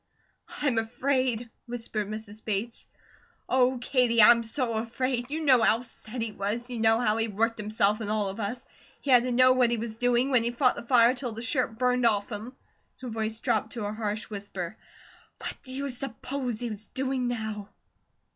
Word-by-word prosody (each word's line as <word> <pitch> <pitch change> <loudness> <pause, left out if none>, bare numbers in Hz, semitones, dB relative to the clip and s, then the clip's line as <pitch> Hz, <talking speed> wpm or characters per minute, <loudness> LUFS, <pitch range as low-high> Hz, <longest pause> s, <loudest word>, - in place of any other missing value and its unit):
"I'm 255 -6 +2
afraid!" 245 0 -1 0.2
whispered 230 -3 -3
Mrs. 215 0 -7
Bates. 220 +2 -3 0.6
"Oh, 255 0 +3
Katie, 245 -2 +2
I'm 235 +2 +8
so 230 +1 -2
afraid. 245 +2 -2
You 310 +3 -3
know 260 -6 +5
how 225 +2 +3
SET 230 0 -7
he 225 - -3
was, 215 +5 -3
you 240 - -3
know 225 0 +4
how 220 -3 +2
he 225 0 +1
worked 225 +2 0
himself 210 0 +1
and 210 - -3
all 210 -1 +1
of 195 +3 -6
us 220 +4 -3 0.4
he 280 - -2
had 245 -1 +8
to 250 +1 -2
know 255 +1 +6
what 255 -2 +4
he 235 - +1
was 225 0 -4
doing, 245 +2 +2
when 250 -3 +5
he 235 - 0
fought 250 +1 +3
the - - -6
fire 235 0 +5
till 250 -3 -4
the 225 +2 -6
shirt 240 -2 0
burned 250 0 +3
off 205 0 0
him" 225 +5 -6 0.5
her 255 - -5
voice 220 0 -3
dropped 220 -3 0
to 225 -4 -4
a 205 - -3
harsh 215 -1 -3
whisper 200 -3 -6 0.6
"what - - -5
do 260 - -11
you 275 +2 -3
s'pose 250 -1 -4
he's 220 -3 -5
doing 260 -1 -1
now?" 220 -4 -4
235 Hz, 195 wpm, -28 LUFS, 220-250 Hz, 0.6 s, I'm